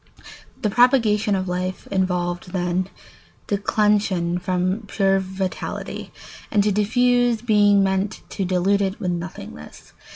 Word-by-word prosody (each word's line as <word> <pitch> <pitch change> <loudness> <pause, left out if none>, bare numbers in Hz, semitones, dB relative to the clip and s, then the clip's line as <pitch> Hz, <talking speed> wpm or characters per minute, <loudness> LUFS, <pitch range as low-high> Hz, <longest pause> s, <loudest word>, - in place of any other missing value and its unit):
The 210 - +2
propagation 220 -4 +3
of 190 0 -2
life 180 +1 -3
involved, 180 -1 -1
then, 180 0 -1 0.6
declension 200 -4 +1
from 185 +4 -1
pure 195 -1 +2
vitality, 190 0 -5 0.4
and 205 -2 +2
to 210 - +2
diffuse 245 +3 +2
being 205 -3 +4
meant 190 +2 -1
to 195 - -3
dilute 185 +2 +1
it 195 0 -2
with 180 - -1
nothingness. 170 - -8
195 Hz, 120 wpm, -22 LUFS, 180-210 Hz, 0.6 s, being